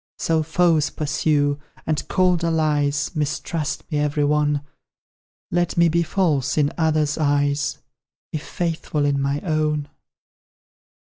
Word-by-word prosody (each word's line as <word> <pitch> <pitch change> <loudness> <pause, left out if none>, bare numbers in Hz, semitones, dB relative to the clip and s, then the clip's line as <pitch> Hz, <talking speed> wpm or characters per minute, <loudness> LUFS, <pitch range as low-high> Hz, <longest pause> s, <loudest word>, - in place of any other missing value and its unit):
So 160 -1 +1
foes 160 -1 +2
pursue, 145 -1 0 0.3
and 155 -1 -1
cold 180 -2 +2
allies 150 -3 +1
Mistrust 155 0 -2
me, 150 - 0
every 150 0 0
one: 150 0 +2 0.9
Let 175 -1 0
me 170 0 +5
be 170 +2 +2
false 155 -6 0
in 145 -1 +2
others' 155 -2 +1
eyes, 145 -1 +1 0.6
If 155 - -2
faithful 165 -3 -2
in 140 -1 +1
my 140 +1 -1
own. 155 -3 -1
150 Hz, 120 wpm, -22 LUFS, 145-160 Hz, 0.9 s, me